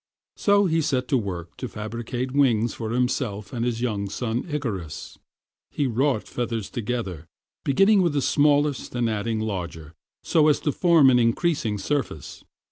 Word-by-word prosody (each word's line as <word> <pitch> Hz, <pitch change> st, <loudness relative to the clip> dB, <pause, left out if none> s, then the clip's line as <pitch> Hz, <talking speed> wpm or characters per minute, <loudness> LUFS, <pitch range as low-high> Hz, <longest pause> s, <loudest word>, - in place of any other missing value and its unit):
So 200 Hz, 0 st, +3 dB
he 165 Hz, -2 st, +2 dB
set 130 Hz, -4 st, 0 dB
to 135 Hz, -, +3 dB
work 90 Hz, -5 st, -6 dB
to -, -, -4 dB
fabricate 120 Hz, +4 st, -5 dB
wings 120 Hz, -5 st, +2 dB
for 110 Hz, -2 st, -5 dB
himself 120 Hz, -3 st, -1 dB
and 120 Hz, -2 st, -2 dB
his 120 Hz, -1 st, -1 dB
young 105 Hz, -5 st, -1 dB
son 120 Hz, -, -3 dB
Icarus. 110 Hz, -, -5 dB, 0.5 s
He 145 Hz, -, -1 dB
wrought 130 Hz, -1 st, +1 dB
feathers 115 Hz, -4 st, -3 dB
together, 105 Hz, -9 st, -4 dB, 0.4 s
beginning 195 Hz, +9 st, +4 dB
with 170 Hz, -4 st, +1 dB
the 145 Hz, -, +1 dB
smallest 145 Hz, -2 st, +2 dB
and 120 Hz, -1 st, +1 dB
adding 110 Hz, 0 st, -1 dB
larger, 90 Hz, -7 st, -5 dB, 0.3 s
so 155 Hz, -2 st, +3 dB
as 150 Hz, -, +3 dB
to 150 Hz, -, 0 dB
form 165 Hz, -5 st, +5 dB
an 125 Hz, -, +4 dB
increasing 115 Hz, -2 st, +1 dB
surface. 120 Hz, -, -3 dB
120 Hz, 155 wpm, -24 LUFS, 105-145 Hz, 0.5 s, form